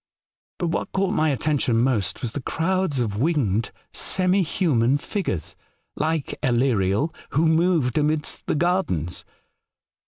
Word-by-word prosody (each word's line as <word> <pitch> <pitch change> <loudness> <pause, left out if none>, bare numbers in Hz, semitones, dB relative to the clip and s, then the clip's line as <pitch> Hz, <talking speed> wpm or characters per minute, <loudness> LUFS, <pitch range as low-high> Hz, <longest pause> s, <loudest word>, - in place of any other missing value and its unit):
But 175 - -1
what 165 - -2
caught 195 +1 +1
my 155 -4 +2
attention 140 -4 +1
most 120 -1 0
was 120 - -1
the 140 - -4
crowds 170 0 0
of 105 -4 -1
winged 120 - +1 0.2
semi 185 +1 +2
human 145 - +2
figures, 145 - -3 0.4
like 155 -1 -1
Aleriel, 120 - +1 0.2
who 155 +4 +3
moved 160 -5 +2
amidst. 150 0 -1
the - - +1
gardens. 150 - 0
150 Hz, 125 wpm, -24 LUFS, 120-170 Hz, 0.4 s, who